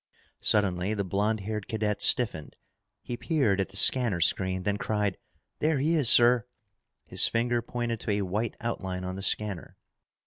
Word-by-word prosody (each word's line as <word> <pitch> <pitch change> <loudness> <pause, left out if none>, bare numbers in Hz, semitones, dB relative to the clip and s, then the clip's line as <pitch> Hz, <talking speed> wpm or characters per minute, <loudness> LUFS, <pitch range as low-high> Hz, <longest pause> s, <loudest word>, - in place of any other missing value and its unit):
Suddenly 100 -1 +1
the 100 - -1
blond 100 +3 -1
haired 105 0 -5
cadet 105 -2 -2
stiffened. 105 - +1 0.5
He 120 - -5
peered 120 - +1
at 95 - -3
the 95 - -5
scanner 115 -4 +3
screen, 95 +2 0
then 100 +1 -1
cried, 105 -2 -1 0.4
"There 155 0 +1
he 150 +5 +1
is, 145 -8 +4
sir!" 120 0 +6 0.6
His - - +2
finger 120 +1 0
pointed 120 -1 -4
to 110 - -3
a 100 0 -1
white 105 +5 -3
outline 95 -6 -4
on 90 0 -5
the 95 - -6
scanner. 100 -2 -2
105 Hz, 165 wpm, -27 LUFS, 95-120 Hz, 0.6 s, sir